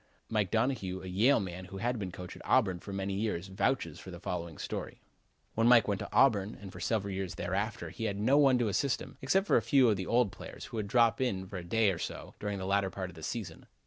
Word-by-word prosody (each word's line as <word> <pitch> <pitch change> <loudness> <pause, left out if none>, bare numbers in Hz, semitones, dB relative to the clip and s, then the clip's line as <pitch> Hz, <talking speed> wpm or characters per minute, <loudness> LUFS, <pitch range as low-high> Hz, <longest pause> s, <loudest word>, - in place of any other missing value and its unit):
Mike 105 -4 +1
Donohue, 110 -5 0
a - - -7
Yale 110 +10 +4
man 95 -2 -5
who 95 - -9
had 120 +3 -1
been 95 -3 -4
coach 90 0 -8
at - - -12
Auburn 95 -9 +2
for 100 - -9
many 100 0 -2
years, 95 -3 -2
vouches 95 - -1
for - - -10
the - - -8
following 85 -3 -4
story: - - -5 0.5
When 115 +1 +2
Mike 120 -3 +7
went 100 -2 0
to - - -6
Auburn 110 -6 +3
and 95 -2 -9
for 90 - -10
several 100 +1 -1
years 95 -2 -3
thereafter 100 +6 -2
he 115 - -4
had 100 -2 -1
no 130 +7 +4
one 135 -3 +5
to 120 -2 +1
assist 125 +6 +1
him, - - -11
except 190 +9 +2
a - - +6
few 135 -4 +4
of 105 - +2
the 95 - -4
old 120 -4 +3
players, - - -9
who - - -7
would 105 -2 -2
drop 115 +2 +3
in 95 -7 0
for 95 0 -7
a 90 - -6
day 105 +3 +2
or 85 - -4
so - - -6
during 105 -1 -3
the 95 - -4
latter 100 0 +1
part 95 -1 -5
of - - -17
the 80 - -11
season. 110 +4 -5
100 Hz, 255 wpm, -31 LUFS, 95-115 Hz, 0.5 s, Mike